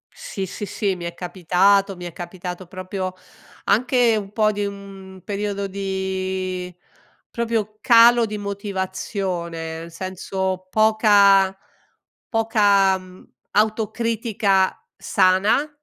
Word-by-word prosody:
Sì, 195 -2 -5
sì, 195 +3 -6
sì, 195 0 -1
mi 175 -1 -7
è 170 - -4
capitato, 190 +3 +2
mi 175 0 -9
è 175 - -7
capitato 180 +1 -7
proprio 185 +1 -5 0.5
anche 245 0 +3
un 200 -2 -4
po' 215 0 +2
di 205 0 -3
un 195 -1 -9
periodo 200 -1 -3
di 190 -1 -3 0.6
proprio 225 -2 -2
calo 235 0 +6
di 210 0 -5
motivazione, 190 -4 -4
nel 165 +1 -9
senso 185 +1 -4
poca 200 -3 +4 0.7
poca, 205 -4 +3
mhmm, 185 0 -16 0.2
autocritica 215 -2 +1 0.2
sana, 195 +10 +2
195 Hz, 105 wpm, -22 LUFS, 185-210 Hz, 0.7 s, calo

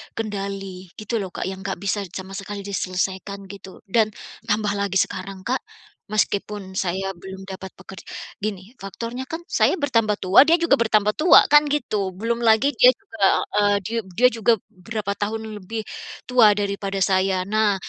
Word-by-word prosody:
kendali, 195 -3 -5
gitu 215 +2 -3
loh 195 - -3
Kak, - - -3
yang 190 0 -5
enggak - - -2
bisa 200 +2 -1 0.2
sama 190 0 -6
sekali 200 +1 -6
diselesaikan, 195 0 -3
gitu, 195 -1 -12
dan 220 +2 +3 0.4
tambah 210 -1 +1
lagi 200 -1 -2
sekarang, 190 0 -3
Kak, 255 +2 0 0.5
meskipun 205 -2 -1
saya 190 +1 -1
belum 190 +1 -10
dapat 190 0 -8
peker 190 -1 -11 0.4
gini, 200 -1 -5
faktornya 230 +6 -6
kan 325 +4 -6
saya - - +3
bertambah 230 - +1
tua, 195 +10 +7
dia 330 - +6
juga 335 -5 +2
bertambah 215 -2 +3
tua, 315 +9 +6
kan 295 0 +7
gitu. 210 -10 -1
Belum 230 +4 -2
lagi 235 +4 +4
dia 250 - +9
juga, 220 -3 -7 0.4
eee, 205 0 +3
di 205 - -6 0.2
dia 250 +5 +6
juga 230 0 +3 0.2
berapa 200 +2 -4
tahun 220 +1 -3
lebih 220 +3 -5 0.4
tua 230 -5 +5
daripada 200 -1 -2
saya. 190 -1 +2
Nah, 210 +1 +2
205 Hz, 160 wpm, -23 LUFS, 195-225 Hz, 0.5 s, dia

